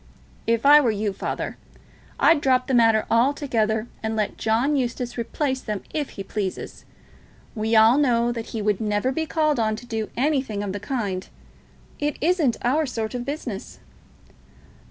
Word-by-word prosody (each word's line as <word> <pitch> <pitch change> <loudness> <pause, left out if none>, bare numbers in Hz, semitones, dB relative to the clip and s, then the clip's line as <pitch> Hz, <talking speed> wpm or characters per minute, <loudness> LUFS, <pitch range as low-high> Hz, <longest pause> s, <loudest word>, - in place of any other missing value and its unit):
"If 230 +2 +1
I 295 +1 +9
were 250 - +2
you, 210 -1 -1
father, - - -4 0.6
I'd 325 -3 +5
drop 255 -2 +3
the 265 - -2
matter 225 -2 +4
altogether, 230 -4 +1 0.2
and 220 0 -2
let 215 -2 -1
John 235 +7 +1
Eustace 245 -2 -2
replace 260 +3 -2
them 210 -3 -4
if 295 -3 -2
he 195 - -4
pleases. 195 -1 -5 0.7
We 220 +1 0
all 220 +5 +6
know 240 -4 +2
that 230 -2 -5
he 220 -2 -4
would 210 0 +1
never 210 +4 0
be 320 +4 -2
called 305 -4 +1
on 215 -1 +1
to 235 - -10
do 225 -3 -3
anything 260 -6 0
of 195 -2 -3
the 205 - -4
kind. 205 -5 -3 0.7
It 295 -1 -1
isn't 315 -6 +2
our 295 +5 +2
sort 225 -3 -3
of 245 -1 -4
business." 290 +3 -5
235 Hz, 165 wpm, -24 LUFS, 220-275 Hz, 0.7 s, I